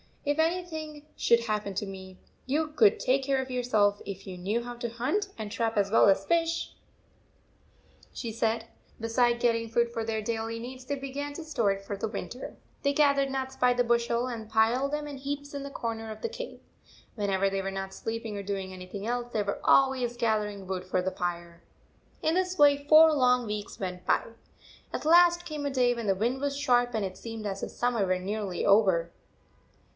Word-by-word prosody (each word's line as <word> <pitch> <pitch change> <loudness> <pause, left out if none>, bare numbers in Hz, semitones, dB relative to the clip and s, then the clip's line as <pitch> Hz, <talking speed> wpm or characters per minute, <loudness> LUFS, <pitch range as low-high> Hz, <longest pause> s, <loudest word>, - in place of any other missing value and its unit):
"If 290 +2 0
anything 320 -3 -2
should 235 0 +3
happen 210 -3 -2
to 205 - -1
me, 190 -1 -9 0.3
you 305 +4 +1
could 225 -9 +4
take 265 +2 +2
care 270 0 +1
of 260 0 -7
yourselves 220 -5 +2
if 195 -1 -7
you 190 - -7
knew 205 +7 -2
how 245 0 -6
to 235 0 -4
hunt 260 - -1
and 215 -2 -5
trap 225 0 -1
as 200 -1 +2
well 225 - +6
as 195 0 +3
fish," 335 0 0 1.4
she 230 - -5
said.. 225 0 0 0.3
Beside 235 +1 +2
getting 230 -1 +1
food 235 +1 +1
for 230 -1 -3
their 220 -1 -2
daily 225 +1 -3
needs, 255 +2 -8
they 285 - -2
began 280 +1 -5
to 325 - -7
store 235 -10 +1
it 195 0 -4
for 200 +1 -4
the 220 - -2
winter. 215 +3 -6 0.3
They 280 - +1
gathered 280 -2 +3
nuts 265 0 -3
by 250 0 +3
the 245 0 +2
bushel 235 0 +1
and 225 -3 -6
piled 230 +5 +2
them 300 0 -2
in 285 -1 -7
heaps 285 +1 -5
in 285 - -4
the 280 - -6
corner 225 -4 -4
of 215 - -9
the 465 - -2
cave. - - -7 0.5
When 205 -3 -2
ever 195 0 +2
they 195 0 -1
were 195 0 -3
not 195 0 -5
sleeping 225 -1 -4
or 200 - -4
doing 195 -1 -4
any 185 0 -8
thing 200 +2 -6
else, 240 +1 -2
they 215 -3 0
were 200 - -3
always 260 -3 +3
gathering 210 -4 -1
wood 185 -1 -4
for 185 0 0
the 190 - -1
fire. 170 -1 -4 0.6
15* - - +3
In 325 - +1
this 370 0 0
way 285 -1 +5
four 315 +1 +8
long 250 -3 +3
weeks 210 -1 -5
went 180 -2 -5
by. - - +3 0.7
At - - -4
last 345 +1 +6
came 300 -2 -4
a 285 - -1
day 250 -2 +3
when 235 -3 -5
the 195 - +3
wind 240 +7 -1
was 280 -1 -1
sharp, 245 -4 +2
and 215 -2 0
it 185 -1 -6
seemed 225 -2 -7
as 195 -1 -3
if - - -4
summer 240 -4 0
were 185 0 +1
nearly 195 -1 -3
over. 190 -5 +4
235 Hz, 210 wpm, -28 LUFS, 205-275 Hz, 1.4 s, four